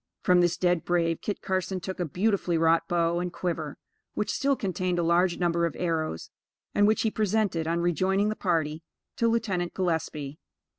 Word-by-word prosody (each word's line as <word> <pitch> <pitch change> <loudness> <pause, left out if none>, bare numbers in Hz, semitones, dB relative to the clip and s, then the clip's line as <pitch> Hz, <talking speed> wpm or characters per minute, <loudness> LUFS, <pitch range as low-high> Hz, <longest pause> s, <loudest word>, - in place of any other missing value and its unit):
From 180 -1 +5
this 175 0 +2
dead 175 -2 +1
brave, 170 -2 0
Kit 205 - -4
Carson 185 0 -1
took 190 +1 -6
a 175 - 0
beautifully 180 +1 0
wrought 165 0 +3
bow 170 0 +1
and 180 0 -3
quiver, 165 -5 -3 0.4
which 210 - -1
still 275 0 +1
contained 185 -4 -2
a 175 - +1
large 170 +1 +2
number 170 -1 +1
of - - -7
arrows, 160 - -2 0.4
and 205 0 +4
which 215 - +2
he 220 - +1
presented, 210 -6 0
on 170 +1 0
rejoining 190 +4 +1
the 215 - -2
party, 160 -5 -1 0.4
to 230 - +2
Lieutenant 205 -7 -1
Gillespie. 160 -5 -2
175 Hz, 180 wpm, -27 LUFS, 165-190 Hz, 0.4 s, From